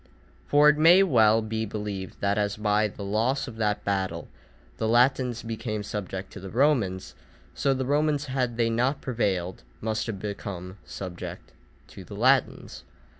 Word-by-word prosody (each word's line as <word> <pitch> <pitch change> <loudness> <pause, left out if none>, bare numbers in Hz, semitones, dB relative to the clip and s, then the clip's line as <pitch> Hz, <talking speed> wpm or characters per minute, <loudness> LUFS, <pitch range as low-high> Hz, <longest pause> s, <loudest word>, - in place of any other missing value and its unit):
For 145 +1 +5
it 150 0 +5
may 175 +5 +7
well 115 - +4
be 110 0 -2
believed 105 -3 -5
that 100 0 +1
as 105 0 -1
by 105 0 +2
the 100 0 -9
loss 115 +8 0
of 115 -3 -9
that 105 -2 -1
battle 95 -4 -2 0.5
the 110 - -1
Latins 125 +1 +2
became 110 -2 -4
subject 95 -2 -5
to - - -8
the 95 0 -8
Romans, 115 -7 +1 0.4
so 140 - +1
the 130 0 -2
Romans 145 +1 +1
had 130 -3 -2
they 115 -1 +2
not 125 +5 +1
prevailed 95 -8 -2 0.2
must 110 0 -2
have 105 -4 -4
become 95 -2 -6
subject 90 -2 -8 0.4
to - - -11
the - - -10
Latins. - - +1
110 Hz, 160 wpm, -26 LUFS, 100-125 Hz, 0.5 s, may